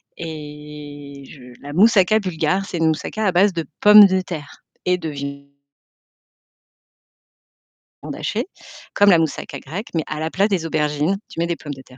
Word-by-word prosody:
et 150 -3 -9
je 140 - -13 0.2
la 145 +1 -8
moussaka 210 +2 +4
bulgare, 185 -1 -1
c'est 180 - -5
une 165 -1 +2
moussaka 160 +7 -2
à 190 - +2
base 195 +4 +4
de 165 -3 -4 0.2
pommes 210 0 +10
de 190 -1 +2
terre 155 -6 -8 0.2
et 180 0 +2
de 165 -3 -5
viande 140 -1 -7 2.7
hachée, - - -3 0.5
comme 205 0 +5
la 180 - +7
moussaka 155 -3 -3
grecque, 180 - -7
mais 160 -2 0
à 155 - -4
la 160 +1 -2
place 200 +2 +2
des 185 -5 -1
aubergines, 150 +3 0
tu - - -14
mets 170 - +1
des 170 - -1
pommes 145 -2 -7
de 135 - -11
terre. 130 -1 -18
160 Hz, 170 wpm, -20 LUFS, 150-190 Hz, 2.7 s, pommes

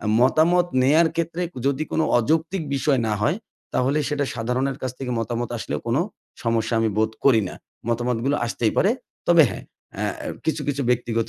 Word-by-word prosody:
অ্যা 105 - -3
মতামত 170 +6 +4 0.2
নেয়ার 160 +5 +5
ক্ষেত্রে 170 +1 -1 0.2
যদি 140 +2 +1
কোন - - +1 0.2
অযৌক্তিক 160 +8 0
বিষয় 135 0 +2
না 110 - 0
হয়, 155 - +2 0.4
তাহলে 135 +4 +2
সেটা 145 -1 0
সাধারণের 125 +3 -1
কাছ 130 - -1
থেকে 130 -2 -4
মতামত 120 0 -2
আসলেও - - -3
কোন 115 +3 +1 0.5
সমস্যা 115 0 0
আমি 115 - +2
বোধ 110 0 +2
করি 125 -5 +6
না। - - -8 0.3
মতামতগুলো 120 +4 0
আসতেই 115 -1 0
পারে। 200 - +4 0.4
তবে 170 -2 +8
হ্যাঁ, - - -7 0.3
অ্যা - - -1
অ্যা - - -5 0.2
কিছু, 160 -1 0
কিছু 140 0 0
ব্যক্তিগত 115 -2 0
130 Hz, 175 wpm, -23 LUFS, 115-155 Hz, 0.5 s, তবে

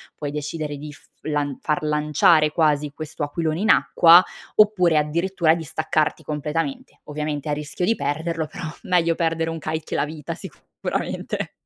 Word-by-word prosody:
puoi 145 -1 -5
decidere 150 0 -4
di 150 +1 -8
f - - -17 0.2
lan 145 -3 -2
far 150 0 -1
lanciare, 150 +1 +3
quasi, 150 -2 +1
questo 155 0 -6
aquilone 155 +2 -2
in 220 - 0
acqua, 170 +2 +7 0.3
oppure, 185 -6 +4
addirittura, 170 +2 +1
di 165 - -5
staccarti 155 0 -1
completamente; 165 - -4
ovviamente 150 0 -4
a - - +1
rischio 150 +4 -3
di 225 - +2
perderlo, 160 +3 -2
però, 160 - -7 0.2
meglio 170 -2 +2
perdere 165 -1 0
un 165 0 -4
kite 155 +1 -3
che - - -4
la - - +2
vita, 150 -1 -6
sicuramente. - - -5
155 Hz, 160 wpm, -23 LUFS, 150-165 Hz, 0.3 s, acqua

